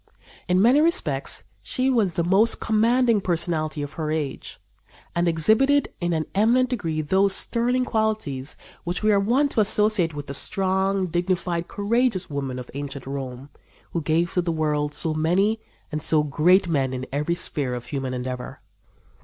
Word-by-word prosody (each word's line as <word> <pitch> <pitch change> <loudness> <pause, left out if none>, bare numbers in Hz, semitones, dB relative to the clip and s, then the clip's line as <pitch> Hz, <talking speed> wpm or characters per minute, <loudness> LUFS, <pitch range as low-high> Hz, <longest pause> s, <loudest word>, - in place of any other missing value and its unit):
In 180 0 +3
many 255 +6 +5
respects 335 +3 0 0.2
she 260 0 -1
was 220 -10 +2
the 170 - +1
most 195 +6 +3
commanding 230 +1 +2
personality 160 -4 -1
of 145 - -7
her 155 - -2
age, 155 -3 -4 0.6
and 170 0 +1
exhibited 220 - +3
in 175 0 0
an 160 -2 0
eminent 240 +5 +3
degree 165 -10 -2
those 190 +5 +2
sterling 250 +2 +1
qualities 215 - -2 0.3
which 175 +4 -3
we 215 - +4
are 200 - +4
wont 255 +8 +2
to - - 0
associate 210 -5 +2
with 145 -1 -5
the 140 - -6
strong, 190 +4 0
dignified, 175 0 -1
courageous 205 -3 0
women 135 -3 -3
of 125 -1 -8
ancient 140 -1 -6
Rome, 135 0 -6 0.4
who 170 - -2
gave 165 +3 0
to 180 - +2
the 170 -1 -2
world 150 -2 -1
so 160 - -1
many 190 +8 +1 0.3
and 155 0 -3
so 155 0 +2
great 175 +6 +3
men 135 -5 0
in 130 0 -4
every 150 +5 -1
sphere 140 -7 -1
of 120 0 -7
human 135 0 -4
endeavor. 125 0 -5
175 Hz, 165 wpm, -24 LUFS, 150-215 Hz, 0.6 s, many